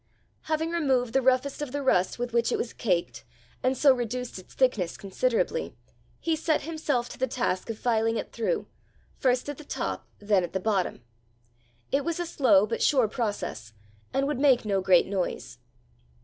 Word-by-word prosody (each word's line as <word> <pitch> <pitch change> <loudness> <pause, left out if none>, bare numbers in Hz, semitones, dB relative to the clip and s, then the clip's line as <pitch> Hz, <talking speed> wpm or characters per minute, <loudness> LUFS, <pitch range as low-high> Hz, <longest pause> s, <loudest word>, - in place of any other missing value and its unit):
Having 320 +1 -1
removed 265 -8 +1
the 270 - +3
roughest 260 +2 +1
of 295 -4 -4
the 285 +1 -3
rust 185 -8 +2
with 245 -1 -4
which 235 0 +2
it - - +1
was 240 - -3
caked, 180 -6 -1 0.4
and 255 0 +1
so 275 0 +6
reduced 245 -2 -4
its 185 - -16
thickness 220 -10 +1
considerably, 245 - -1 0.4
he 330 -1 0
set 315 0 0
himself 295 -6 -1
to - - -10
the 260 - +1
task 240 -7 -2
of 225 - -3
filing 225 -1 +1
it - - -5
through, 230 - -1 0.5
first 255 0 +1
at 290 0 -5
the - - -9
top - - -4
then 205 -3 +2
at 175 - -5
the 190 - 0
bottom. 190 - -1 0.9
It 275 +1 +2
was 335 +3 -2
a 350 - -1
slow 260 - +4
but 230 +1 -3
a - - -6
sure 260 -6 +4
process, 205 - -4 0.4
and 270 +1 +1
would 290 -2 -1
make 270 -5 +4
no 195 -2 +1
great 185 -2 +5
noise. 190 -2 -3
245 Hz, 185 wpm, -27 LUFS, 210-280 Hz, 0.9 s, so